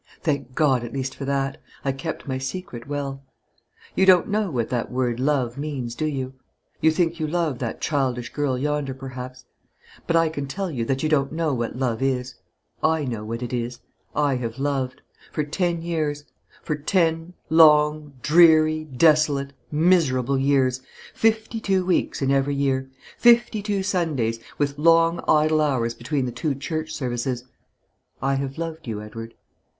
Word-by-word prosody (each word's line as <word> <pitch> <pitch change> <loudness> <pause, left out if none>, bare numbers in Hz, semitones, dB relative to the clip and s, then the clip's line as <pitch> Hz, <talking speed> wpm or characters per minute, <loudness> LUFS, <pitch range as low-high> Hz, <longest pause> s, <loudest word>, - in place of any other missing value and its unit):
Thank 140 -5 -1
God 135 -6 +3
at 120 - -7
least 135 -1 -3
for 140 - -6
that. 135 -1 -1 0.2
I 135 - +2
kept 135 +4 -6
my 130 -1 -2
secret 135 -3 -6
well. 140 -1 -4 0.7
You 190 - +2
don't 180 -2 +6
know 210 -1 0
what 120 -7 -2
that 120 -2 -2
word 125 -2 -1
'love' 130 -2 0
means, 140 -5 -4
do 155 +5 -2
you? 135 -3 -3 0.5
You 160 - +5
think 165 +1 0
you 155 - -1
love 160 -5 -1
that 120 -3 -4
childish 130 -5 -1
girl 145 -3 0
yonder, 145 -1 -1
perhaps; 130 -1 -8 0.6
but 170 - +1
I 165 0 +4
can 145 -3 -4
tell 190 +5 -3
you 120 -6 -2
that 135 +3 -1
you 155 - +1
don't 140 -3 +2
know 160 -2 0
what 120 -2 -2
love 125 -3 -1
is. 130 -1 -1 0.5
I 160 -2 +2
know 115 -5 -4
what 115 +3 -4
it 125 - -5
is. 120 0 -3 0.4
I 145 -3 +2
have 115 -1 -4
loved. 135 -1 -2 0.3
For 150 - -1
ten 170 +2 -1
years, 155 -3 -2 0.4
for 150 - -1
ten 165 +2 0 0.2
long, 150 -2 +5
dreary, 155 -1 +5
desolate, 145 -1 +3 0.2
miserable 150 -6 +2
years, 135 -2 +2 0.3
fifty 220 0 +1
two 190 -3 +1
weeks 180 -5 0
in 135 - +2
every 140 +1 +2
year, 135 -1 0 0.3
fifty 235 -2 +5
two 200 -2 -1
Sundays, 155 - 0 0.2
with 145 0 -1
long 165 +1 +4
idle 155 0 +4
hours 125 -6 +1
between 130 +3 -2
the 125 - -3
two 135 +4 -2
church 155 +3 -4
services 125 -3 -2 0.8
I 135 +1 0
have 135 +1 -3
loved 160 -2 -5
you, 110 -2 -3
Edward. 115 +2 -8
140 Hz, 165 wpm, -24 LUFS, 130-160 Hz, 0.8 s, don't